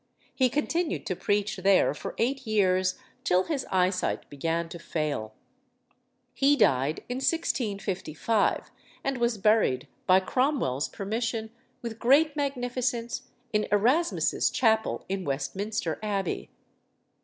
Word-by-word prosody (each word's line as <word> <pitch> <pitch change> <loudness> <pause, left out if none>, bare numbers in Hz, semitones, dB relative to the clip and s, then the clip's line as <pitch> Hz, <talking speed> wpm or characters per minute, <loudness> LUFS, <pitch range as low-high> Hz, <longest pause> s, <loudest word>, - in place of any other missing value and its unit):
He 255 -2 +3
continued 305 +5 -1
to 185 - -2
preach 205 +3 0
there 190 +1 +4
for - - -7
eight 260 +2 -1
years, 185 -3 +2 0.3
till 180 +1 +3
his 295 -5 -3
eyesight 185 0 0
began 165 +4 -1
to 170 - -8
fail. 150 -10 -3 1.0
He 280 +1 +4
died 150 - +2
in 245 - -3
1655, 210 - 0 0.3
and 270 -2 -1
was 235 -1 +1
buried, 205 - +2 0.2
by 185 +1 +7
Cromwell's 190 - 0
permission, 220 +2 -3 0.3
with 230 -1 -5
great 285 +5 +4
magnificence, 245 -4 -2 0.3
in 210 0 +1
Erasmus's 255 +12 +2
chapel 220 -3 +1
in 190 0 -2
Westminster 165 +6 -2
Abbey. 200 -4 -2
215 Hz, 115 wpm, -27 LUFS, 185-250 Hz, 1.0 s, by